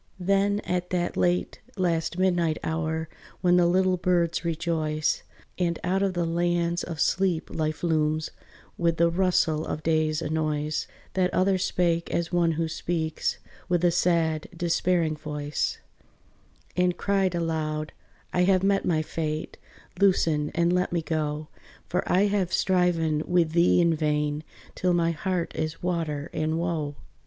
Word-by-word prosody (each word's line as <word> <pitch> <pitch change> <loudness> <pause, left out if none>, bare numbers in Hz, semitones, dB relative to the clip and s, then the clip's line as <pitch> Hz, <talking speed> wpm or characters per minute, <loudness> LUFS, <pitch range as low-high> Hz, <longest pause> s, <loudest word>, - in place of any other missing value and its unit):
Then 200 +2 +2
at 180 0 -2
that 175 -1 -1
late, 180 0 0 0.2
last 170 -2 0
midnight 175 -4 +2
hour, 160 0 -2 0.3
When 180 0 +4
the 175 -1 +5
little 185 +1 +3
birds 170 -1 +1
rejoice, 160 -2 -1 0.4
And 170 -2 +1
out 185 +2 +1
of 195 -2 0
the 175 -1 0
lands 170 0 0
of 165 -3 -6
sleep 180 0 +1
life 155 0 -2
looms 155 -2 +1 0.5
With 170 -1 +2
the 170 0 +3
rustle 170 -3 +2
of 155 - -4
day's 155 -1 +1
annoys, 155 -1 -1 0.3
That 185 -1 +1
other 185 +1 +3
spake 170 -2 0
as 170 0 -1
one 170 -2 +2
who 165 +1 -1
speaks 160 0 -2 0.3
With 175 0 +2
a 175 - +5
sad 165 -3 +1
despairing 170 -2 +1
voice, 150 -1 -3 1.0
And 180 -1 +2
cried 195 -3 +1
aloud, 155 -2 -2 0.4
"I 180 0 +3
have 185 -1 +3
met 195 0 +2
my 155 -3 +1
fate, 155 0 -4 0.4
Loosen, 165 -6 +3
and 170 0 +2
let 180 0 +1
me 170 -2 -1
go; 155 -1 -2 0.4
For 180 - 0
I 185 - +4
have 200 -3 0
striven 170 -4 +2
with 175 -3 +2
thee 170 +2 +4
in 170 -1 +4
vain, 150 -1 0 0.3
Till 180 -1 +1
my 170 -1 +2
heart 175 +1 -2
is 155 +2 -3
water 160 -4 -2
and 155 +1 -1
woe." 165 -4 -2
170 Hz, 145 wpm, -26 LUFS, 155-180 Hz, 1.0 s, the